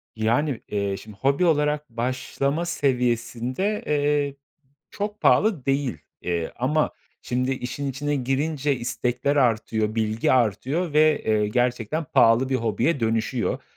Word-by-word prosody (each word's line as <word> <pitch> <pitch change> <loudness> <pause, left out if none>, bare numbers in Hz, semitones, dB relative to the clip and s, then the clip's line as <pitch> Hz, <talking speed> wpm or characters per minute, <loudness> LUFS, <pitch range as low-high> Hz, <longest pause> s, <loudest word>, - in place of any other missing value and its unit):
Yani, 120 +5 0
iii, 100 -1 -2
şimdi 105 -1 -12
hobi 140 - +2
olarak 150 -2 +1
başlama 130 +6 -2
seviyesinde, 130 - -1
eee, 145 -1 +1 0.6
çok 205 +1 -4
pahalı 200 - +3
değil. 135 - 0 0.2
İii, 85 -2 -2
ama 150 +5 +1 0.3
şimdi 125 +1 -1
işin 130 +2 -4
içine 145 +2 -2
girince 140 +2 0
istekler 125 +3 -1
artıyor, 110 -4 +1
bilgi 110 0 +1
artıyor 130 - +1
ve, 155 0 +4
eee, 105 -1 +2
gerçekten 125 +6 0
pahalı 120 -1 +4
bir 135 - -1
hobiye 120 +5 0
dönüşüyor. 115 +2 -1
130 Hz, 120 wpm, -24 LUFS, 115-145 Hz, 0.6 s, ve